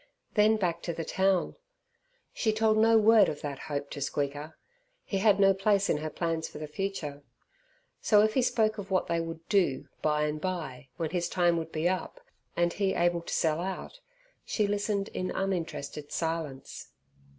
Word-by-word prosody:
Then 215 +1 +4
back 175 -5 -1
to 170 - -3
the 165 0 -4
town. 190 -1 +1 0.8
She 220 - +1
told 215 0 +2
no 225 +1 +6
word 220 -2 +6
of 150 - -5
that 140 -2 -5
hope 140 -1 -3
to 145 - -6
Squeaker, 145 +3 -3 0.5
he 195 - -2
had 205 -1 +4
no 195 0 +6
place 200 +1 +2
in - - +1
her 155 +1 -4
plans 165 0 -2
for - - -10
the 155 - -5
future. 150 -3 -4 0.8
So 210 -1 +5
if 215 0 +2
he 260 - +3
spoke 220 -3 +1
of 200 -1 -7
what 185 -1 +1
they 170 - 0
would 165 0 -7
do 180 -10 +1
by 150 0 +1
and 150 0 -2
by 160 -8 -4
when 165 -2 -2
his 175 -1 -1
time 175 -2 +2
would 165 0 -4
be 155 +2 0
up, 185 - -2 0.4
and 175 0 +2
he 195 -1 0
able 175 0 +2
to - - -8
sell 160 -1 +1
out, 190 - -5 0.4
she 210 - 0
listened 205 0 -1
in 185 - -3
uninterested 165 -6 -3
silence. 160 -5 -4
175 Hz, 185 wpm, -29 LUFS, 155-200 Hz, 0.8 s, no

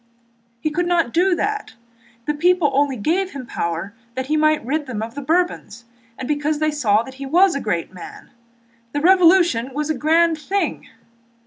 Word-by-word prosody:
"He 310 - -1
could 350 +3 -1
not 335 -8 +1
do 360 +2 +3
that. 420 - -3 0.5
The 300 - 0
people 340 0 +2
only 275 -1 +1
gave 360 - -1
him 270 -3 -7
power 170 -1 -4 0.2
that 260 0 -3
he 300 +3 0
might 310 -3 +2
rid 295 +3 -2
them 220 -4 -4
of 225 +1 -7
the 285 - -6
Bourbons 305 - -1 0.3
and 260 - -6
because 295 +1 0
they 310 0 0
saw 225 -7 +2
that 265 - -11
he - - -4
was 355 +5 +4
a 280 - -3
great 180 -4 -2
man. 180 - -11 0.6
The 290 - -1
Revolution 340 -8 +4
was 300 +1 -1
a - - -1
grand 320 +4 +2
thing!" 395 +6 -2
300 Hz, 185 wpm, -20 LUFS, 255-340 Hz, 0.6 s, was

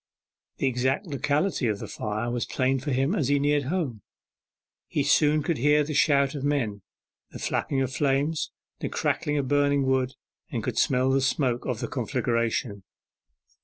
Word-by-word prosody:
The - - -1
exact 130 - 0
locality 145 -1 0
of 105 -2 0
the - - -7
fire 110 +3 -3
was 120 -1 -2
plain 130 0 +1
to 145 +3 -3
him 135 +6 +1
as 150 - 0
he 145 +1 +3
neared 145 0 +1
home. 140 - -2 0.9
He - - 0
soon 150 0 +3
could 160 -2 -1
hear 150 +3 +4
the 155 +1 -4
shout 140 -2 +3
of 140 -3 -5
men, 125 -8 0 0.5
the - - -9
flapping 135 -1 -1
of 130 -1 -1
the - - -5
flames, 145 +2 +1 0.3
the - - -3
crackling 150 0 -1
of 140 -2 -1
burning 145 0 +2
wood, 130 -1 +1 0.4
and - - -3
could - - -1
smell 130 0 +2
the 135 0 +3
smoke 130 -2 0
from - - -1
the - - -3
conflagration. 115 -3 -1
135 Hz, 175 wpm, -26 LUFS, 125-145 Hz, 0.9 s, hear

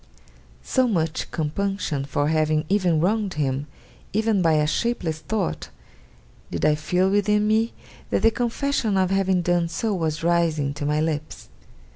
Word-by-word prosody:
So 260 -1 +2
much 165 -7 -1
compunction 160 -2 -2
for 145 +1 -1
having 155 -1 +1
ever 190 -3 +3
wronged 195 +3 0
him, 140 -1 -1 0.5
even 215 -1 +2
by 165 -2 +3
a 150 -1 +3
shapeless 165 -3 -1
thought, 200 +1 -3 0.8
did - - -2
I 150 - +5
feel 180 +5 +1
within 210 +1 +2
me, 220 +2 +2 0.4
that - - 0
the 225 - +6
confession 240 -2 0
of 185 0 +2
having 190 -2 +2
done 175 -1 +1
so 210 +6 -1
was 165 -3 -2
rising 165 -4 +1
to 145 0 -4
my 150 +1 +1
lips. 155 -1 -3
175 Hz, 150 wpm, -23 LUFS, 155-205 Hz, 0.8 s, the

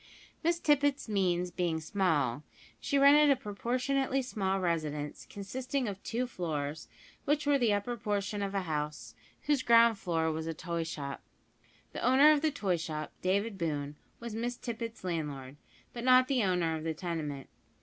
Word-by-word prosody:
Miss 340 +1 +2
Tippet's 285 -4 +2
means 180 -4 0
being 170 -2 -1
small, 160 - 0 0.4
she 280 - 0
rented 290 +2 +7
a 275 -2 +3
proportionately 255 +4 -1
small 195 -6 -1
residence, 155 -5 -2
consisting 250 +6 -3
of 200 -1 -5
two 240 +2 -2
floors, 155 - -4 0.4
which 295 +1 +1
were 285 -1 +3
the 235 -4 +3
upper 205 +4 -1
portion 205 -1 -2
of 200 0 -3
a 195 - +1
house, 150 -2 -4 0.3
whose 295 -2 +2
ground 230 -3 +5
floor 165 -3 0
was 160 +1 -4
a 165 - -3
toy 170 +1 -3
shop. 140 -3 -5 0.7
The - - -5
owner 265 +5 +6
of 300 -2 +3
the 315 - +2
toy 195 - -1
shop, 155 -2 -5
David 200 +2 0
Boone, 145 -3 -2 0.2
was 235 -1 -6
Miss 240 +2 -3
Tippet's 230 -2 -6
landlord; 145 -6 -4 0.4
but 235 - -6
not 255 0 +6
the 265 -3 +1
owner 180 -4 +1
of 155 - -5
the 160 -1 -2
tenement. 155 -5 -4
200 Hz, 165 wpm, -31 LUFS, 160-250 Hz, 0.7 s, rented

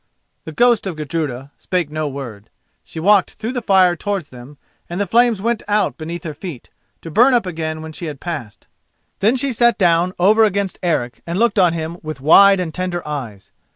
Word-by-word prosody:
The 160 - -6
ghost 240 +3 +2
of 180 - -4
Gudruda 145 -4 -4
spake 180 -5 -2
no 155 0 -2
word. 125 -7 -8 0.3
She - - -9
walked 200 +3 +3
through 225 +2 -4
the 245 - -3
fire 190 -5 +4
towards 195 -3 -4
him, 125 +3 -12 0.3
and 175 +2 -4
the 205 - +1
flames 230 0 +2
went 235 -1 0
out 210 0 +1
beneath 170 +1 -7
her 155 - -5
feet, 150 -4 -9 0.3
to 165 - -8
burn 245 - +5
up 235 - +1
again 160 -3 -4
when 160 - -8
she 170 - -7
had 145 -3 -7
passed. 145 - -7 0.5
Then 215 +6 +3
she 265 0 -1
sat 235 0 +3
down 175 -1 +2
over 210 +5 +4
against 200 -3 0
Eric 145 -9 -2
and 170 +2 -3
looked 230 0 +2
on 180 -3 +4
him 165 +1 -5
with 155 -3 -7
wide 195 +7 +6
and 170 -3 -3
tender 180 -3 -4
eyes. 120 -10 -6
175 Hz, 200 wpm, -19 LUFS, 155-205 Hz, 0.5 s, wide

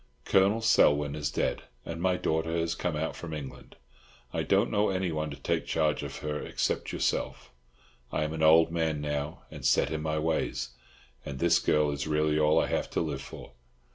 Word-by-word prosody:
Colonel 100 +4 +3
Selwyn 75 -10 +4
is 75 -1 -2
dead, - - -1 0.2
and 85 0 -5
my 90 0 +2
daughter 80 0 -1
has 85 0 0
come 85 -1 -2
out 80 +2 -2
from 80 -2 -6
England. 70 -3 -9 0.6
I - - 0
don't 100 +4 +2
know 105 -1 +2
anyone 85 -5 -1
to 70 - -7
take 70 - -2
charge 80 -2 +1
of - - -6
her 75 0 -2
except - - -2
yourself. - - -2 0.6
I 75 - 0
am 75 +1 -3
an 80 - -4
old 80 +1 +6
man 80 -3 0
now, 75 +1 -3
and - - -9
set 70 - +3
in 80 -1 -2
my 80 0 -1
ways, 80 -4 -1 0.5
and 70 - -6
this 85 +4 +3
girl 75 -3 +2
is 70 +1 -3
really 75 0 +1
all 75 0 +4
I - - +2
have - - -2
to - - -1
live - - -2
for. - - -10
80 Hz, 195 wpm, -29 LUFS, 75-85 Hz, 0.6 s, old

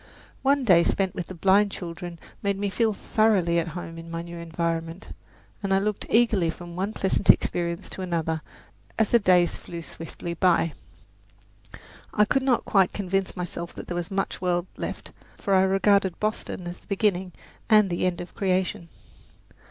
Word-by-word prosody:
One 280 0 +3
day 180 -8 +6
spent 190 +1 +1
with 175 - -5
the 185 - -8
blind 195 +4 +4
children 175 -1 -7 0.2
made 200 -1 0
me 200 0 -1
feel 225 +1 +2
thoroughly 200 -5 +2
at 170 - -2
home 165 -1 -7
in 165 0 -10
my 165 0 -4
new 170 0 -8
environment, 165 +1 -3 0.5
and 200 -1 -2
I 195 - +5
looked 205 +1 -1
eagerly 220 -7 +3
from 175 +1 -7
one 195 +4 -1
pleasant 195 -1 -1
experience 170 -1 +3
to - - -7
another 165 -3 -1 0.6
as 220 -2 +2
the 235 - +6
days 180 -4 +3
flew 170 -1 -8
swiftly 165 +1 -7
by. 170 -2 +2 1.4
I 210 - +5
could 270 +6 +1
not 260 -2 +1
quite 195 -3 +3
convince 195 -1 -2
myself 175 -1 -5
that - - -7
there - - -5
was 175 -1 -3
much 195 -1 -2
world 175 -1 +1
left, - - -6 0.3
for 200 - -1
I 190 - +6
regarded 195 0 +3
Boston 215 -3 -3
as 175 +1 -6
the - - -27
beginning 190 -2 0 0.4
and 210 -4 +5
the 175 +1 +1
end 175 -1 -2
of 175 - -9
creation. 185 -3 -1
185 Hz, 175 wpm, -26 LUFS, 170-200 Hz, 1.4 s, day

